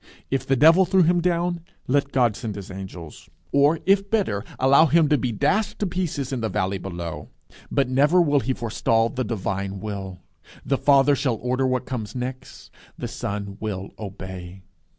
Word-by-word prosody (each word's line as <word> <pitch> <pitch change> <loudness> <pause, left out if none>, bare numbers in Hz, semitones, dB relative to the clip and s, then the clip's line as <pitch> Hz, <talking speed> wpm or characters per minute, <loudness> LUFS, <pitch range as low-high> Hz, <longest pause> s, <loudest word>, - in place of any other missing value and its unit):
If 135 -1 -1
the 135 - +3
devil 165 +8 +6
threw 185 0 +3
him 175 +1 +3
down, 175 0 0 0.2
let 140 +1 +1
God 120 -5 +2
send 110 -5 -5
his 100 -2 -8
angels; 95 -4 -9 0.2
or, 145 +3 +3
if 195 +1 +3
better, 150 - 0
allow 140 +5 +5
him 160 0 +4
to 150 - +4
be 125 - -1
dashed 205 - 0
to 210 - -1
pieces 170 -7 -3
in 125 - -2
the 110 - -1
valley 95 -1 -1
below. 85 -3 -6 0.4
But 135 -2 +1
never 145 +7 +3
will 145 -4 +3
he 130 +2 -1
forestall 115 0 +1
the 130 0 -3
divine 100 -3 -3
will. 95 -2 -6 0.5
The 135 - 0
Father 140 0 +5
shall 130 -3 0
order 125 +3 -1
what 130 0 -1
comes 120 -3 -5
next. 125 +1 -7 0.3
The 120 - -4
Son 105 -4 -5
will 100 -3 -4
obey. 95 -2 -8
125 Hz, 175 wpm, -23 LUFS, 100-145 Hz, 0.5 s, devil